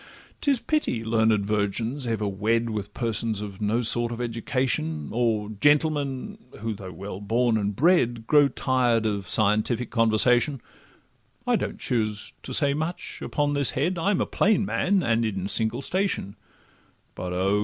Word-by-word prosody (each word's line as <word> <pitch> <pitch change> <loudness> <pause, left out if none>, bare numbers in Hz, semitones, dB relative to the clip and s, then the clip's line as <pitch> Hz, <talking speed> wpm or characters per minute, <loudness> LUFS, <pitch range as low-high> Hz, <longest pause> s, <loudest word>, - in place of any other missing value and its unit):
'Tis 275 -4 +2
pity 300 - -1
learned 110 -2 +2
virgins 110 +6 -1
ever 110 -2 -1
wed 110 +4 0
With 105 -1 -4
persons 115 -2 -1
of 100 -2 -7
no 110 +4 +1
sort 120 +1 +2
of 120 - -5
education, 115 - -2
Or 110 -3 0
gentlemen, 145 - +1 0.2
who, 115 0 -2
though 95 -2 -9
well 95 +3 -7
born 115 +3 +1
and 105 -2 -1
bred, 120 - +2
Grow 145 +2 +5
tired 125 -4 +1
of 100 -3 -2
scientific 110 +3 +1
conversation: 120 +4 +3 0.9
I - - +2
don't - - -3
choose 110 -3 -2
to - - -8
say 140 +1 +3
much 160 +4 -4
upon 145 0 -1
this 140 -3 +3
head, 170 +6 0
I'm 195 +3 +1
a - - +1
plain 215 -1 +2
man, 195 -1 +1
and 115 -2 +1
in 95 -4 -2
a - - -1
single 115 +5 0
station, 185 - -1 0.8
But—Oh! 90 +3 -1
115 Hz, 155 wpm, -25 LUFS, 105-140 Hz, 0.9 s, Grow